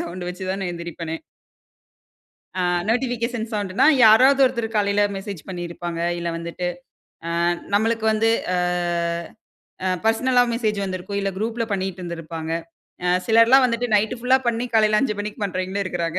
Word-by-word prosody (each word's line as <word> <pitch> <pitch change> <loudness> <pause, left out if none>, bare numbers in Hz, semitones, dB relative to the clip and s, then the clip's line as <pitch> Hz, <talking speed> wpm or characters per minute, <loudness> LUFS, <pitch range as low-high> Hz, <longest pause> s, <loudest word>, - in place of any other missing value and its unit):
Sound 175 +1 -6
வச்சு 185 +1 -7
தான 195 0 -3
எந்திரிப்பனே! 170 -1 -6 1.4
ஆ - - +1 0.3
notification 240 -1 -1
சவுண்ட்டுன்னா, 205 +1 +1 0.2
யாராவது 255 +6 +6
ஒருத்தரு 235 -3 0
காலையில 205 0 +2
மெசேஜ் 195 -2 -6
பண்ணியிருப்பாங்க. 175 -2 -5 0.2
இல்ல 170 0 -3
வந்துட்டு, 170 +2 -5 0.8
அ - - +3 0.3
நம்மளுக்கு 225 +1 +1
வந்து 225 +1 +2 0.3
அ - - +1 1.3
அ - - +2 0.2
பெர்சனலா 245 +3 +3
மெசேஜ் 215 -3 -1
வந்திருக்கும். 190 +1 -4
இல்ல 195 0 -1
குரூப்ல 230 +2 -2
பண்ணிட்டு 190 -1 -3
இருந்திருப்பாங்க. 165 -1 -5 0.5
அ 180 - +1 0.2
சிலர்லாம் 230 +4 +6
வந்துட்டு 235 +1 -1
நைட் 210 +4 +2
ஃபுல்லா 250 +2 +3
பண்ணி 235 0 0
காலையில 215 -1 +4
5:00 245 -6 0
மணிக்கி 210 +2 -6
பண்றவங்களும் 190 +1 -2
இருக்குறாங்க. 175 -1 -2
205 Hz, 135 wpm, -22 LUFS, 180-230 Hz, 1.4 s, யாராவது